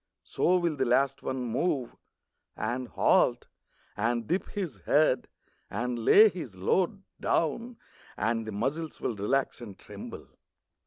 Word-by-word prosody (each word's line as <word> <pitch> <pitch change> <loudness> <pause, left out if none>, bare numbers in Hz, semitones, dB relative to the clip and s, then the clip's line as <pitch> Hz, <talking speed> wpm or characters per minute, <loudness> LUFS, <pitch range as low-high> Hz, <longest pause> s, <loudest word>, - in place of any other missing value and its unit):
So 180 +1 +2
will 170 -4 0
the 135 - +1
last 135 +2 +2
one 130 -1 -3
move, 125 +1 -1 0.6
And 120 +3 -2
halt, - - +2 0.5
and 115 +2 0
dip 185 - -1
his 185 - -4
head, 145 -4 +3 0.4
and 120 +3 -2
lay 215 - +8
his 160 - -5
load 185 - 0 0.2
Down, 230 +10 0 0.4
and 115 +1 0
the - - -4
muscles 140 +10 -3
will 115 - -2
relax 125 +7 0
and 105 -5 -9
tremble. - - -9
130 Hz, 135 wpm, -29 LUFS, 115-165 Hz, 0.6 s, lay